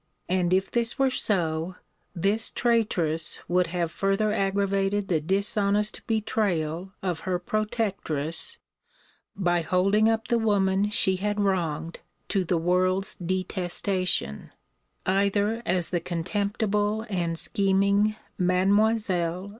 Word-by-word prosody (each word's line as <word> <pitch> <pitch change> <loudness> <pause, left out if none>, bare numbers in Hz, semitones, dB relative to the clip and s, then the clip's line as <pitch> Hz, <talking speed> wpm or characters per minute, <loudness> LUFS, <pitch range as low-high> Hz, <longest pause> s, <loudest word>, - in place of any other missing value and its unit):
And, 180 -1 0
if 190 +1 +1
this 235 -1 +1
were 270 -1 +2
so, 170 -6 0 0.4
this 200 +6 +1
traitress 185 -10 +1
would 180 0 +2
have 170 -1 -2
further 195 +3 0
aggravated 195 0 0
the 160 -4 +1
dishonest 200 +4 +1
betrayal 190 -6 -1
of 180 -4 -2
her 180 +2 -2
protectress, 190 -6 -2 0.8
by 175 -3 +1
holding 195 +6 +2
up 225 0 -1
the 235 - +1
woman 200 -2 +1
she 190 -3 +2
had 205 +2 -2
wronged 170 -5 -1 0.3
to 195 -2 +1
the 175 0 0
world's 185 +3 +1
detestation, 185 - -1 0.6
either 200 +4 +1
as 180 -2 0
the 175 - 0
contemptible 205 +5 -1
and 170 -5 -2
scheming 200 +2 +2 0.2
Mlle. 185 -1 +1
195 Hz, 110 wpm, -26 LUFS, 175-210 Hz, 0.8 s, were